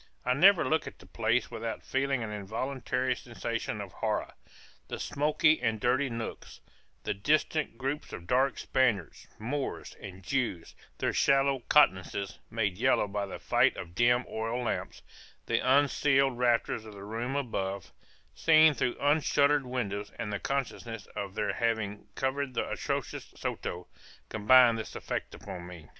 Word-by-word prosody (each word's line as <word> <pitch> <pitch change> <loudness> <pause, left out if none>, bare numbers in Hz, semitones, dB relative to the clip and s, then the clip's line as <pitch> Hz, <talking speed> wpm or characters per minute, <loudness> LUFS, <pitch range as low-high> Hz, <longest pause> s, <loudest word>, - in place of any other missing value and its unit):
I 125 - +3
never 175 +1 +6
look 160 +4 +1
at - - -9
the - - -16
place 115 +2 0
without 115 -1 -4
feeling 135 -2 0
an 110 - -5
involuntary 125 +5 -2
sensation - - -4
of - - -6
horror - - -2 0.5
the - - -5
smoky 150 0 +2
and 110 -3 0
dirty 130 +4 +2
nooks 115 -1 -6 0.4
the - - -1
distant 150 +5 0
groups 135 +4 -3
of 85 - -8
dark 130 +7 +2
Spaniards, 120 - 0
Moors, 135 +5 -4
and 95 -1 -9
Jews, 115 -9 -2 0.2
their - - 0
sallow 135 -1 +3
countenances 100 -6 +3
made 105 -4 -1
yellow 130 -4 +3
by 100 0 -3
the - - -6
fight - - +2
of 85 - -7
dim 120 +4 +3
oil 115 +3 -3
lamps 120 - -3 0.4
the - - +1
unceiled 135 0 +3
rafters 120 -2 +1
of 110 -1 -11
the 100 - -9
rooms 115 +6 -3
above, 100 -6 -4 0.4
seen 155 -1 +6
through 125 -2 -1
unshuttered 145 -1 +3
windows 105 -5 -3
and 105 - -4
the 105 - -2
consciousness 120 -5 -3
of 100 -1 -5
their 105 - 0
having 110 -3 -1
covered 135 -1 -2
the - - 0
atrocious - - -3
Soto, 90 0 -4 0.4
combine 115 +2 +6
this 110 - -6
effect - - -4
upon 90 -3 -8
me. 85 -4 -11
120 Hz, 150 wpm, -30 LUFS, 105-135 Hz, 0.5 s, never